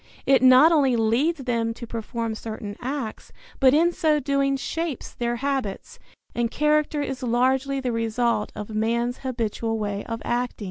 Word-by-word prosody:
It 270 -3 +4
not 260 +5 +7
only 275 -6 +3
leads 260 +8 +1
them 230 -2 -1
to 235 - -8
perform 230 0 -4
certain 215 -2 -6
acts, 260 -3 -5 0.3
but 265 -2 +6
in 335 +3 +4
so 310 -3 +1
doing 275 0 +1
shapes 320 +3 -4
their 240 0 -2
habits; 275 - -3 0.3
and 235 -1 0
character 300 +1 +1
is 270 -1 -5
largely 260 +3 +1
the 255 -2 -2
result 230 -1 0
of 210 +1 -6
man's 235 +3 0
habitual 230 -3 -2
way 205 -1 -3
of 230 -1 -4
acting. 245 +1 -2
245 Hz, 155 wpm, -24 LUFS, 230-275 Hz, 0.3 s, not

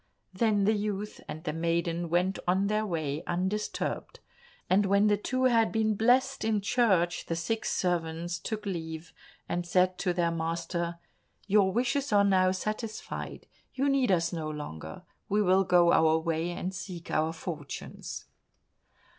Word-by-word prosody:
Then 210 0 +2
the 215 +3 +4
youth 210 0 -3
and 155 +1 -7
the 175 - -2
maiden 170 +1 -1
went 180 +3 +1
on 190 +2 +3
their 215 +1 0
way 155 -4 -2
undisturbed, 190 +4 -2 0.5
and 195 +2 +3
when 200 +1 +4
the 210 -1 +4
two 255 +5 -2
had 230 -3 +4
been 220 -1 +1
blessed 255 +5 +2
in 220 -1 +1
church, 195 -5 +1
the 165 - -1
six 175 +7 -2
servants 170 -1 -1
took 215 +4 -4
leave, 160 -3 -5 0.3
and 175 - -1
said 180 +1 +2
to 185 - +1
their 175 -1 +1
master, 170 +1 -2 0.5
"Your 200 -2 +4
wishes 260 +5 0
are 205 -1 +5
now 190 -2 +4
satisfied, 215 +4 -4 0.3
you 275 +2 +1
need 270 -5 +2
us 170 -1 +1
no 160 -2 -3
longer, 80 - -7 0.3
we 205 - +2
will 190 0 +4
go 175 -2 +5
our 160 0 +5
way 165 +1 -1
and 180 +2 -4
seek 170 -1 -7
our 155 +1 +1
fortunes." 155 -4 -7
185 Hz, 155 wpm, -29 LUFS, 170-210 Hz, 0.5 s, are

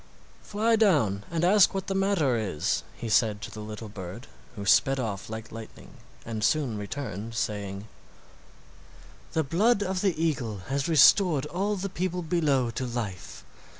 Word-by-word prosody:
"Fly 220 +2 +1
down 140 - +2
and 165 0 -2
ask 195 +1 +5
what 190 -1 -2
the 195 - -2
matter 195 -9 +2
is," 100 -9 -1
he 115 - -6
said 110 -1 +2
to - - -6
the 110 - -9
little 105 +1 -7
bird, 95 -3 -8 0.3
who 100 - -6
sped 135 +6 +4
off 105 -5 -4
like 110 0 -7
lightning 115 -1 -10 0.3
and 110 -2 -4
soon 130 -2 +1
returned 110 0 -5
saying: 100 -2 -3 1.5
"The 160 - +1
blood 200 - +2
of 190 -1 -2
the 190 -6 0
eagle 135 -10 -1
has 140 0 -1
restored 155 0 +5
all 195 +6 -1
the 195 0 -3
people 180 -1 -3
below 145 -7 +1
to 130 +3 -3
life. 115 -6 -6
135 Hz, 155 wpm, -27 LUFS, 110-180 Hz, 1.5 s, ask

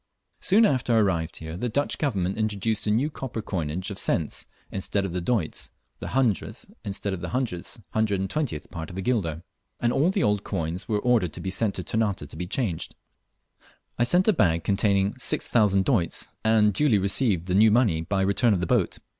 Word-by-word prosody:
Soon 215 +4 +4
after 130 - +1
I - - +5
arrived 85 -6 +1
here 80 0 -7
the 120 +7 -2
Dutch 140 +6 -1
Government 100 - 0
introduced 110 0 -1
a - - +2
new 125 +9 +1
copper 130 -5 -5
coinage 90 -2 -3
of 100 - -4
cents 80 -4 -1 0.2
instead 100 +1 -1
of 95 - -4
doits 105 -7 -1 0.3
(the - - -6
100th 125 -7 -1
instead 100 0 -2
of 90 - -5
the 85 - -4
120th 100 - -2
part 80 -1 -6
of 90 - -9
a - - -2
guilder), 90 -10 -1 0.4
and 120 0 +1
all 155 +6 +3
the 195 -2 0
old 105 -1 +1
coins 85 0 -3
were 105 - +2
ordered 105 -6 +1
to - - -6
be 95 - -4
sent 105 +1 0
to 90 - -4
Ternate 100 -9 -1
to 75 - -12
be 90 +2 -4
changed. 105 -5 -3 1.0
I - - +4
sent 180 - +3
a 215 - +6
bag 85 - +2
containing 100 +2 +1
6,000 100 -6 +2
doits, 100 - 0
and 110 -2 +4
duly 140 -2 +3
received 100 -2 +1
the 90 - -2
new 110 +3 +6
money 105 -8 +3
by 95 +4 -1
return 100 +3 +3
of - - -1
the 90 - -1
boat. - - +1
100 Hz, 190 wpm, -25 LUFS, 90-120 Hz, 1.0 s, a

